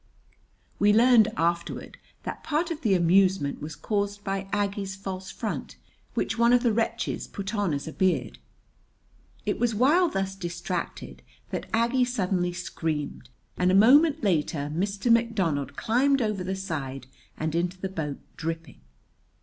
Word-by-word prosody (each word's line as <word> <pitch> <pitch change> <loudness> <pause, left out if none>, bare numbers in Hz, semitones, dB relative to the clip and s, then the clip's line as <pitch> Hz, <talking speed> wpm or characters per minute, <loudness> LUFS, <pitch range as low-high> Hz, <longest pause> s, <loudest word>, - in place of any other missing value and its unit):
[We 205 0 +5
learned 230 -1 +6
afterward 170 +1 -2 0.2
that - - -6
part 320 +3 0
of 320 -1 -4
the 210 -6 +3
amusement 180 -3 +3
was 150 0 -6
caused 205 +1 -2
by 195 -1 -3
Aggie's 200 -1 -1
false 190 -1 -6
front, - - -5 0.4
which - - -1
one 235 +1 +5
of 245 0 +4
the 235 -3 +3
wretches 230 +1 -1
put 200 +1 -5
on 205 -5 0
as 145 +1 -3
a 160 - -6
beard.] 185 -1 0 1.1
It - - -1
was 235 -2 +1
while 310 - +4
thus 195 -6 -2
distracted 175 -1 -5 0.3
that - - -4
Aggie 235 +3 +2
suddenly 185 -7 0
screamed, 160 -6 -4 0.3
and 180 - +2
a - - +4
moment 285 +9 +6
later 155 -6 0
Mr. 200 +6 0
McDonald 185 - +1
climbed 270 - +2
over 215 -5 -1
the 190 +1 -2
side 140 -9 -5 0.3
and 155 0 -2
into 175 +2 -1
the 190 - -2
boat, 155 -7 -4 0.2
dripping. 165 - -5
195 Hz, 150 wpm, -27 LUFS, 170-230 Hz, 1.1 s, learned